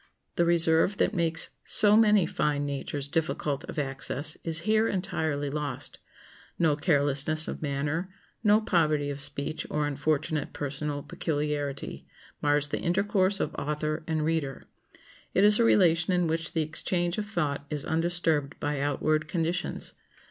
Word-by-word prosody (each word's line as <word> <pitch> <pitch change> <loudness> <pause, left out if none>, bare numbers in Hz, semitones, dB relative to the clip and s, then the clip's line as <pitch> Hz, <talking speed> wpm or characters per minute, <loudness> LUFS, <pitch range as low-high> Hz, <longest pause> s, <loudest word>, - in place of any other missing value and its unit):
The 170 - +2
reserve 170 +3 +3
that - - +1
makes 165 -3 +2
so 205 0 +5
many 210 -4 +5
fine 145 -2 -1
natures 140 0 -4
difficult 150 -2 -2
of - - -9
access 140 +1 +1
is 165 -1 +1
here 220 +3 +2
entirely 160 -7 -2
lost. 145 -1 -4 0.6
No 160 -3 +3
carelessness 145 0 +2
of - - -5
manner, 150 +5 -2 0.3
no 210 0 +5
poverty 155 -7 +1
of 140 0 -5
speech 145 +2 -3
or 150 -1 0
unfortunate 150 +1 -1
personal 145 0 -4
peculiarity, 150 -4 -3 0.3
mars 145 0 +2
the - - -2
intercourse 195 +2 +1
of 155 - -2
author 150 +2 -2
and 155 -2 -1
reader. 155 -4 -2 0.7
It 190 - +4
is 210 +1 +7
a - - +5
relation 175 -5 +3
in 180 -1 +2
which 165 0 -2
the 160 - +1
exchange 175 +4 -1
of 210 - -4
thought 145 -8 -2
is 150 -2 -3
undisturbed 165 -3 0
by 145 -1 -2
outward 155 +2 0
conditions. 170 +2 -2
155 Hz, 145 wpm, -27 LUFS, 145-175 Hz, 0.7 s, is